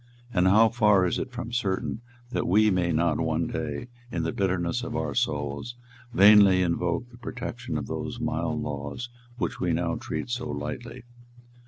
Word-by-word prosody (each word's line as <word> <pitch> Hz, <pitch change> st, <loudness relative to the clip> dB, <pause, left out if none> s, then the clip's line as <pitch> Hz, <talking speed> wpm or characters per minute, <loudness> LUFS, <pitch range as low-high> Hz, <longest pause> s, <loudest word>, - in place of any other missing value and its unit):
And 90 Hz, 0 st, +3 dB
how 110 Hz, +4 st, +6 dB
far 105 Hz, -5 st, +4 dB
is 90 Hz, -, 0 dB
it 130 Hz, -, -4 dB
from 120 Hz, -1 st, -6 dB
certain 110 Hz, -1 st, -1 dB, 0.3 s
that -, -, -1 dB
we 105 Hz, +3 st, +4 dB
may 90 Hz, -2 st, +1 dB
not 80 Hz, -1 st, +1 dB
one 80 Hz, 0 st, 0 dB
day, 120 Hz, -, -4 dB, 0.2 s
in 85 Hz, -, -2 dB
the 80 Hz, -, -1 dB
bitterness 90 Hz, -3 st, 0 dB
of -, -, -5 dB
our -, -, -1 dB
souls, 75 Hz, +10 st, -2 dB, 0.4 s
vainly 100 Hz, -3 st, +7 dB
invoke 90 Hz, +7 st, -1 dB
the 120 Hz, -, -15 dB
protection 120 Hz, -7 st, -5 dB
of 70 Hz, -, -3 dB
those -, -, -5 dB
mild -, -, -1 dB
laws 75 Hz, -, -5 dB, 0.3 s
which -, -, -2 dB
we 90 Hz, -2 st, +1 dB
now 85 Hz, 0 st, 0 dB
treat -, -, -4 dB
so 125 Hz, 0 st, -3 dB
lightly! 115 Hz, -, -5 dB
95 Hz, 170 wpm, -27 LUFS, 85-120 Hz, 0.4 s, vainly